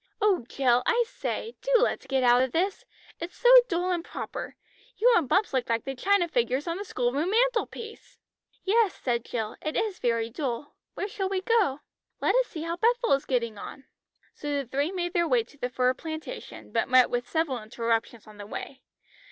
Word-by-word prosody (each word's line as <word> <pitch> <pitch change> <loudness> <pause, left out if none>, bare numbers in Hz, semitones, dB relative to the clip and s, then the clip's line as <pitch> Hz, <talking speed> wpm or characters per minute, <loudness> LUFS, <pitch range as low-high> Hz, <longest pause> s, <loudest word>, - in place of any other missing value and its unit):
"Oh, 405 - +2
Jill, 250 -3 +3
I 475 0 +4
say, - - -4
do - - -3
let's 265 - 0
get 265 -1 +1
out 245 0 +6
of 260 -1 0
this. 375 +4 0 0.3
It's 340 +1 -7
so 485 - +4 0.2
dull 355 0 0
and 345 -2 -1
proper. - - -6 0.4
You 485 +3 +5
and 305 - +2
Bumps 390 -3 +2
look 255 -3 0
like 230 0 +1
the 270 - -3
china 380 +6 +2
figures 255 -1 0
on 335 +1 -1
the 400 - -4
school 245 -10 -1
room 305 +6 0
mantelpiece." 455 0 -1 0.5
"Yes," 425 -1 +3
said 240 -2 -1
Jill; 220 -3 -4
"it 310 - -2
is 420 -4 -1
very 230 -1 0
dull. 265 0 -4 0.2
Where 400 - -2
shall 390 -2 -3
we 385 -1 -1
go?" 385 - +2 0.4
"Let - - +2
us - - +3
see 320 -3 -6
how 335 +1 -3
Bethel 470 - +2
is 275 - +1
getting 235 -5 -1
on." 270 - -9 0.5
So 295 - -5
the 280 -1 -1
three 280 +6 -1
made 350 -2 -3
their 340 -2 +2
way 475 +3 +3
to 370 - -20
the 250 - -2
fir 250 0 +2
plantation, 315 - -8
but - - 0
met 255 -1 +5
with 245 0 -2
several 310 -7 0
interruptions 230 +1 -2
on 215 -1 -14
the 205 -1 -9
way. 265 +5 -7
310 Hz, 200 wpm, -27 LUFS, 250-395 Hz, 0.5 s, out